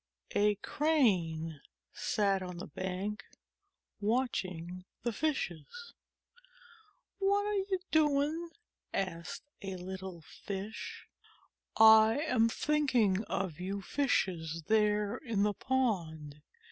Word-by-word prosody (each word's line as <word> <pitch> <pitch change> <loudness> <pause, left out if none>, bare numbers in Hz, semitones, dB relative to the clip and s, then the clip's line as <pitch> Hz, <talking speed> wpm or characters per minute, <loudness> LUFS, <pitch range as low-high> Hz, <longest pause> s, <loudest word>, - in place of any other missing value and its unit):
A 210 0 +3
Crane 175 - +1 0.3
sat 210 -3 +1
on 180 -1 -6
the 175 - -6
bank 190 +3 -4 0.8
watching 185 -6 -1 0.2
the 235 -1 -1
Fishes. 310 - -3 1.3
"What 400 +1 +2
are 420 - -1
you 390 -1 0
doing?" 305 +2 +2 0.5
asked 170 -4 -3 0.2
a 190 -2 -4
little 185 -1 -7
Fish. 200 +6 -7 0.7
"I 220 +1 +8
am 255 -7 +2
thinking 255 -9 +2
about 190 -4 -2
you 195 +2 -3
Fishes 170 - 0
there 210 -1 +2
in 225 -7 -1
the 210 0 +2
pond. 170 - -1
210 Hz, 95 wpm, -32 LUFS, 180-260 Hz, 1.3 s, I